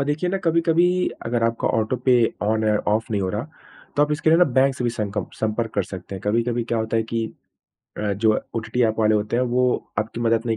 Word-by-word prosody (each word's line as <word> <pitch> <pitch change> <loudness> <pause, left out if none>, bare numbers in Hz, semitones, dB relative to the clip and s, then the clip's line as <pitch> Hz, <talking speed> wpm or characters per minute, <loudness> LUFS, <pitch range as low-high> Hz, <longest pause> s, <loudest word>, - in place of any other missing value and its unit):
और - - +1
देखिए 155 +5 0
ना, 195 - 0
कभी-कभी 170 +2 +3 0.2
अगर 115 0 0
आपका 115 0 0
ऑटो 110 +3 0
पे 130 - +5 0.3
ऑन 110 +1 +1
है, 105 -1 +3
ऑफ 110 +3 -1
नहीं 100 -2 0
हो 95 - -1
रहा, 110 +7 -3 0.5
तो 145 - +5
आप 150 0 +1
इसके 155 +1 +1
लिए 165 - +5
ना, 180 - +7
बैंक 135 0 +2
से 125 - -3
भी 120 - +2
संकप 105 -4 -3
संपर्क 110 +1 -1
कर 100 - +2
सकते 95 +1 -8
हैं। 95 - -6
कभी-कभी 115 +3 +1
क्या 115 0 -1
होता 110 +1 -1
है 115 - +2
कि 115 -1 0 0.8
अ, 105 - +1
जो 110 +2 +2 0.2
ओटीटी 115 +2 -2
एप 110 0 -2
वाले 110 -1 +3
होते 105 +2 0
हैं, 125 - +2
वो 125 0 0
आपकी 110 +2 -3
मदद 115 -1 +2
नहीं 115 -1 0
115 Hz, 245 wpm, -23 LUFS, 110-130 Hz, 0.8 s, ना